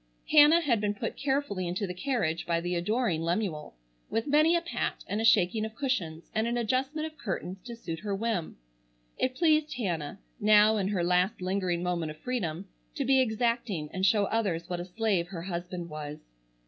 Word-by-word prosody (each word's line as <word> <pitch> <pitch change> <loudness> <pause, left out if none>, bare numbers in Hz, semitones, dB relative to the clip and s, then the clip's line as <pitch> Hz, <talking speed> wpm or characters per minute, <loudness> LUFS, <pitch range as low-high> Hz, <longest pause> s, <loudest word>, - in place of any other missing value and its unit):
Hannah 305 +2 +7
had 240 -9 +1
been 205 -1 0
put 225 +2 -4
carefully 270 -10 -1
into 180 +4 -2
the 180 - -4
carriage 180 - -1
by 170 -1 +1
the 175 +1 -3
adoring 180 0 0
Lemuel, 170 - -2 0.3
with 225 0 -1
many 305 +4 +4
a 340 - +2
pat, 340 - -3
and 210 +2 -2
a - - -1
shaking 215 -1 +4
of 220 0 -5
cushions, 185 - -2
and 220 +1 +1
an 240 +1 0
adjustment 265 +6 0
of 315 -1 -9
curtains 185 -2 -4
to 240 -1 -6
suit 165 -8 -6
her 205 0 -2
whim. 205 -5 -2 0.6
It 255 0 0
pleased 310 -2 +2
Hannah, 175 -9 -3 0.2
now 215 0 +5
in 195 -2 0
her 195 -4 0
last 180 +5 +2
lingering 185 -2 -1
moment 175 -3 -1
of 155 - -8
freedom, 195 -7 -3 0.3
to 280 - -1
be 265 0 +5
exacting 220 -8 -1
and 185 - -3
show 200 +1 +4
others 195 -7 -1
what 175 -1 -3
a 175 - -4
slave 190 -2 0
her 175 -3 -7
husband 175 -1 -5
was. 150 -1 -6
205 Hz, 190 wpm, -29 LUFS, 175-240 Hz, 0.6 s, Hannah